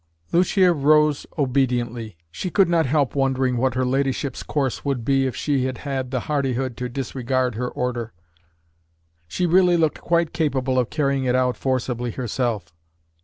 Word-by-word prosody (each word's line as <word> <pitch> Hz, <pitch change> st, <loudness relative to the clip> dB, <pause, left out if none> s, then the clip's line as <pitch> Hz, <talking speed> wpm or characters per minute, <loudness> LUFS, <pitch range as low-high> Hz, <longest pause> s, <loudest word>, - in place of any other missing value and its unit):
Lucia 180 Hz, +1 st, +4 dB
rose 150 Hz, 0 st, +3 dB
obediently. 120 Hz, -, -1 dB
She 185 Hz, -, -4 dB
could 195 Hz, +1 st, +3 dB
not 170 Hz, -4 st, +2 dB
help 140 Hz, -1 st, +1 dB
wondering 130 Hz, -2 st, +1 dB
what 130 Hz, +2 st, +1 dB
her 130 Hz, 0 st, +1 dB
ladyship's 135 Hz, 0 st, -1 dB
course 135 Hz, -4 st, -2 dB
would 135 Hz, -5 st, -2 dB
be 135 Hz, 0 st, +2 dB
if 125 Hz, -, -4 dB
she 140 Hz, -3 st, 0 dB
had 130 Hz, 0 st, -4 dB
the 130 Hz, -2 st, -2 dB
hardihood 135 Hz, -4 st, -1 dB
to 125 Hz, 0 st, -3 dB
disregard 130 Hz, -1 st, -1 dB
her 125 Hz, +3 st, -3 dB
order. 120 Hz, -2 st, -3 dB, 1.2 s
She 180 Hz, -, -1 dB
really 180 Hz, 0 st, +4 dB
looked 160 Hz, -2 st, 0 dB
quite 170 Hz, -1 st, +1 dB
capable 135 Hz, -5 st, 0 dB
of 125 Hz, -, 0 dB
carrying 140 Hz, -3 st, 0 dB
it 125 Hz, 0 st, +2 dB
out 125 Hz, -1 st, +2 dB
forcibly 125 Hz, -2 st, -2 dB
herself. 115 Hz, -6 st, -3 dB
130 Hz, 155 wpm, -22 LUFS, 125-145 Hz, 1.2 s, Lucia